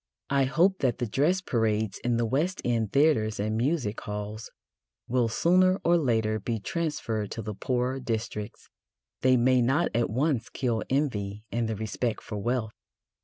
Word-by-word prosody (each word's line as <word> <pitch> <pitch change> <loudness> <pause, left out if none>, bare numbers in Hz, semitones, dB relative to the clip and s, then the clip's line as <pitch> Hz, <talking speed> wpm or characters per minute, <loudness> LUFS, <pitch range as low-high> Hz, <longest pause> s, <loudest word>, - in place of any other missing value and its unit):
I 140 -1 +3
hope 180 +8 +2
that 125 -4 +1
the 125 - -1
dress 150 - +1
parades 110 - 0
in 120 -1 +1
the 115 - +1
West 150 +11 0
End 115 -4 0
theatres 135 -8 +3
and 110 +1 -1
music 120 -3 0
halls 105 +1 -5 0.6
will 120 -1 +2
sooner 185 - +3
or 170 - +4
later 110 -8 +1
be 115 +2 -2
transferred 115 - -2
to 115 - -5
the 105 +1 -4
poorer 125 +5 -1
districts. 110 -3 -4 0.5
They 130 0 +5
may 125 +1 +4
not 135 +8 +2
at 115 +1 +1
once 130 0 0
kill 120 -4 -1
envy 105 -8 -1
and 115 -1 -1
the 110 - -1
respect 110 +2 -3
for 105 - -5
wealth. 115 0 -1
120 Hz, 165 wpm, -27 LUFS, 110-135 Hz, 0.6 s, They